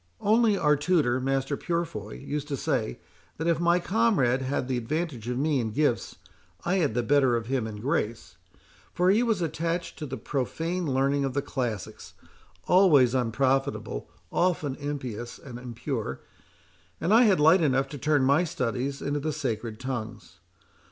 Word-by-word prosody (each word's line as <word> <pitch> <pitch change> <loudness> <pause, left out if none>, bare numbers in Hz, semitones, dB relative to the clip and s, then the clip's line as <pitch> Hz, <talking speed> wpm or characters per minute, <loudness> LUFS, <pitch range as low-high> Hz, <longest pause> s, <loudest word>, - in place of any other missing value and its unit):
Only 220 0 +3
our 150 -4 +3
tutor, 145 -5 +2
Master 135 +2 0
Purefoy, 160 - -3
used 150 0 -4
to 140 -2 -3
say, 60 - -1 0.4
that 160 - -3
if 170 -1 +2
my 170 +1 +3
comrade 175 - +2
had 130 -1 -2
the 130 - -1
advantage 125 -1 -3
of 125 - -2
me 145 0 +1
in 115 -2 -1
gifts, 130 +1 0 0.5
I 180 +3 +2
had 150 - +1
the 120 - +1
better 135 -1 +3
of 115 -1 -2
him 125 -2 -1
in 110 - -6
grace; 115 -1 -2 0.6
for 180 +1 +4
he 215 +4 +3
was 225 -7 +1
attached 165 +2 -3
to 150 - -4
the 135 0 -5
profane 160 +7 -2
learning 140 +2 +1
of 135 -2 -2
the 140 - 0
classics, 120 -8 -4 0.5
always 150 -10 +5
unprofitable, 130 - 0 0.2
often 165 -6 +1
impious 130 -5 -5
and 120 -3 -9
impure; 120 - -4 0.8
and 175 +6 +1
I 240 +2 +7
had 195 -6 +4
light 160 +5 +6
enough 135 -3 +2
to 145 - -7
turn 145 +1 +2
my 140 +6 +4
studies 135 -3 -2
into 145 +1 -1
the 155 +2 -2
sacred 115 -6 -3
tongues. 115 -7 -6
140 Hz, 165 wpm, -27 LUFS, 125-165 Hz, 0.8 s, I